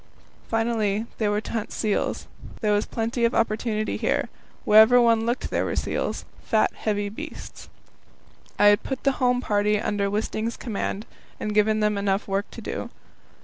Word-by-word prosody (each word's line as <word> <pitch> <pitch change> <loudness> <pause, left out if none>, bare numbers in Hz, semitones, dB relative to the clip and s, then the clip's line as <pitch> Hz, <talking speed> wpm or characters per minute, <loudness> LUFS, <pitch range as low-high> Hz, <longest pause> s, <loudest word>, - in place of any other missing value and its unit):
Finally, 225 -2 0
they 215 - +1
were 205 0 +1
to - - -8
hunt 225 -2 -3
seals. 215 -2 -1 0.4
There 210 -2 +2
was 205 +1 +1
plenty 230 +1 -2
of 235 - +2
opportunity 215 -1 0
here; - - 0 0.4
where 215 +1 +8
ever 245 +3 +6
one 230 -1 +3
looked 240 +2 -2
there - - +1
were - - -2
seals - - -2 0.2
fat - - +2
heavy 205 -1 -2
beasts. 300 +11 -9 0.9
I - - +4
had 205 -1 +4
put 265 -2 -5
the 275 - +4
home 250 0 +3
party 210 -2 +1
under 205 -1 -1
Wisting's 220 +2 -2
command, 215 -2 -3 0.3
and 210 - -3
given 215 +1 +3
them 210 -1 +1
enough 200 0 0
work 195 +1 -1
to - - -10
do. - - -5
215 Hz, 170 wpm, -25 LUFS, 205-230 Hz, 0.9 s, where